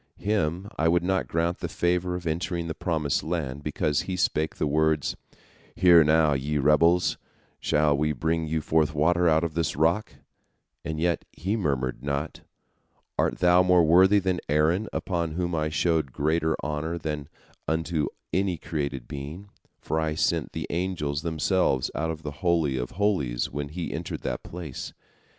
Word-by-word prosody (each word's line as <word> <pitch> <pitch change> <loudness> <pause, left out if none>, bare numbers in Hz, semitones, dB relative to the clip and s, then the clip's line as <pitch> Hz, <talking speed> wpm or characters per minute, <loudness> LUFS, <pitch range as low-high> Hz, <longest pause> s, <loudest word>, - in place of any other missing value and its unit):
Him 95 -3 -1
I 80 - +3
would 85 +1 +3
not 95 +1 0
grant 85 +2 -1
the 85 - -3
favor 90 +2 0
of 90 -1 -6
entering 85 +1 -2
the 80 - -3
promised 80 -5 -1
land, 75 -5 -3
because 75 +1 0
he 90 +1 -4
spake 80 -3 0
the - - -1
words, 75 0 +1 0.6
'Hear 85 -3 +7
now, 75 0 +4
ye 70 +3 -1
rebels; 80 +5 +3 0.4
shall 75 -1 +2
we 75 +2 +1
bring 80 +1 -1
you 80 0 -1
forth 75 -1 +1
water 85 +3 +3
out 80 +1 +3
of 85 -2 -2
this 80 0 -1
rock?' 85 +8 +1 0.7
And 80 +1 -4
yet 85 -1 0
he 95 +6 -2
murmured 65 - -1
not. 70 +2 -3 0.8
Art - - +1
thou 90 0 +6
more 90 -1 +5
worthy 95 +5 +6
than 95 -2 0
Aaron, 80 +8 +2
unto 85 -4 -2
whom 90 0 -1
I 75 -1 0
showed 80 -2 +1
greater 80 +3 +1
honor 75 +3 -2
than 75 -3 -4 0.4
unto 80 0 0 0.3
any 95 -1 +1
created 70 -5 -4
being, 75 +8 -7 0.3
for 80 - -2
I 80 -1 -1
sent 85 -4 0
the - - -3
angels 85 -5 -2
themselves 80 -3 +1
out 80 - -2
of 80 -1 -5
the 75 - -4
Holy 85 -6 +2
of 60 -1 -3
Holies 90 -12 0
when 70 +1 -4
he 85 +3 -5
entered - - -5
the - - -3
place? 80 -7 -7
80 Hz, 165 wpm, -26 LUFS, 75-90 Hz, 0.8 s, Hear